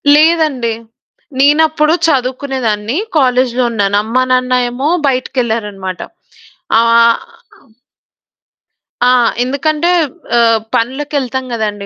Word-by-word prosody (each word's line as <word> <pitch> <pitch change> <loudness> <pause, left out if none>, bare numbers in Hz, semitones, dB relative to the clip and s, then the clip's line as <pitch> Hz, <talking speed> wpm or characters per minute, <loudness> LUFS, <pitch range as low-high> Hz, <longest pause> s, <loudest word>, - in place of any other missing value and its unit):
లేదండి. 300 -7 +2 0.7
నేనప్పుడు 305 +2 +3
చదువుకునే 265 -1 -1
దాన్ని, 210 +5 -2 0.2
కాలేజులో 255 -2 +1
ఉన్నాను. 205 -2 0
అమ్మ 250 +4 0
నాన్న 255 0 +1 0.2
ఏమో 260 +4 -3 0.2
బయటికెళ్లారన్నమాట. 220 -8 -3 0.8
ఆ - - +5 2.3
ఆ! - - +5 0.3
ఎందుకంటే 300 +5 -1 0.5
ఆహ్, 230 -1 +3 0.2
పనులకెళ్తాం 260 +1 -2
కదండి, 210 -3 -3
255 Hz, 80 wpm, -13 LUFS, 230-285 Hz, 2.3 s, ఆ